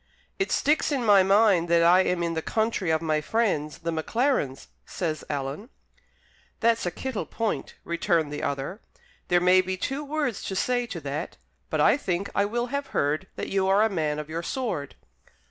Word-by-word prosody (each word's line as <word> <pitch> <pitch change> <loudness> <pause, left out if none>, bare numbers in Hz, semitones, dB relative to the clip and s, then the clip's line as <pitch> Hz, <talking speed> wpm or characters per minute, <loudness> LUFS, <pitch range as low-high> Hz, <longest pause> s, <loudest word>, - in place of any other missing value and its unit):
"It 390 - 0
sticks 300 +2 +2
in 265 -4 0
my 205 -3 +7
mind 195 -3 +4
that 170 0 +4
I 175 +2 +6
am 180 -2 0
in 170 0 -1
the 160 - -2
country 220 -2 -1
of 160 0 +1
my 155 -1 +1
friends, 155 -6 0
the 170 0 -3
Maclarens," 160 - 0 0.2
says 160 -4 -3
Alan. 145 - -4 0.9
"That's 230 -4 +2
a - - +2
kittle 260 +4 -4
point," 225 -1 -3
returned 170 -3 0
the 145 - -4
other. 140 +9 -3 0.5
"There 175 - +4
may 180 +1 +5
be 185 0 -3
two 270 +9 -3
words 290 -6 -2
to 190 - -3
say 245 +5 0
to 180 - -5
that. 145 +4 -5 0.3
But - - 0
I - - +5
think 195 -6 -2
I 200 - +2
will 240 +4 -1
have 280 0 -2
heard 155 - -1
that - - -4
you 195 -1 +1
are 195 +2 +4
a 220 - +3
man 155 -6 -1
of 150 -1 -5
your 165 +2 -4
sword?" 175 - -3
185 Hz, 190 wpm, -26 LUFS, 160-225 Hz, 0.9 s, my